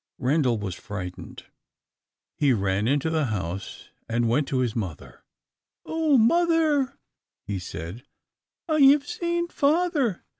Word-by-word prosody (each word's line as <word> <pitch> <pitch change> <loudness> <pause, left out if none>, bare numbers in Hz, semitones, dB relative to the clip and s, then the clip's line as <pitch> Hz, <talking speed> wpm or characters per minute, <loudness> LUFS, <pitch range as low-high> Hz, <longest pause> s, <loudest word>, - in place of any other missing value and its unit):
Randal 130 -2 +1
was 100 -3 -4
frightened. 90 -1 -8 0.9
He 140 -3 +3
ran 100 0 0
into 145 +4 +1
the 160 -2 +1
house, 95 -4 -5 0.2
and 115 +1 +1
went 135 +5 +1
to 135 - -1
his 120 -3 -1
mother. 95 -9 -6 0.6
"Oh, 320 -3 +2
mother," 305 +1 +3 0.5
he 100 -2 -3
said, 90 +4 -7 0.7
"I 310 -2 +1
have 280 +1 +6
seen 345 +2 -2
father! 295 - +1
145 Hz, 120 wpm, -25 LUFS, -, 0.9 s, have